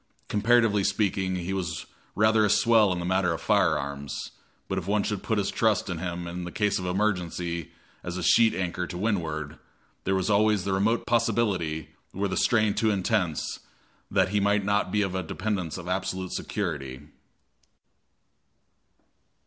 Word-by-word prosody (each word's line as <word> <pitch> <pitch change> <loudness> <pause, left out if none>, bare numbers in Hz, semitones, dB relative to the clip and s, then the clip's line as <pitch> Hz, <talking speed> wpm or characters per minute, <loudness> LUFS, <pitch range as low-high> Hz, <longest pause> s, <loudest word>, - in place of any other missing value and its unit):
Comparatively 105 -1 +3
speaking, 95 -1 0
he 90 +1 -3
was 85 -5 -3 0.3
rather 110 +1 +4
a 105 - +3
swell 110 -2 +4
in 90 - -1
the 85 - -3
matter 95 -1 +1
of 80 - -4
firearms; 70 0 0 0.4
but 95 - -1
if 90 - -9
one 105 0 +2
should 105 -3 -2
put 110 - -1
his 100 -1 0
trust 105 -4 +1
in 85 - -4
him 85 0 -4
in 85 +1 -5
case 105 -3 +1
of 90 - -4
emergency 90 -4 -1 0.3
as 90 +1 -4
a 90 - -3
sheet 115 +6 +5
anchor 90 -1 -2
to 90 - -6
windward, 80 -7 -2 0.4
there 95 - +1
was 95 -1 0
always 105 -1 +3
the 100 - -1
remote 110 +5 +1
possibility, 105 -9 0 0.3
were 100 +2 0
the 95 - -3
strain 110 -3 +3
too 110 - +1
intense, 95 -5 0 0.5
that - - +2
he 105 +1 +1
might 100 0 +2
not 100 -2 +1
be 105 +1 +2
a 95 -1 -2
dependence 90 0 -3
of 90 -1 -8
absolute 95 0 -2
security. 70 -10 -4
95 Hz, 160 wpm, -27 LUFS, 90-105 Hz, 0.5 s, sheet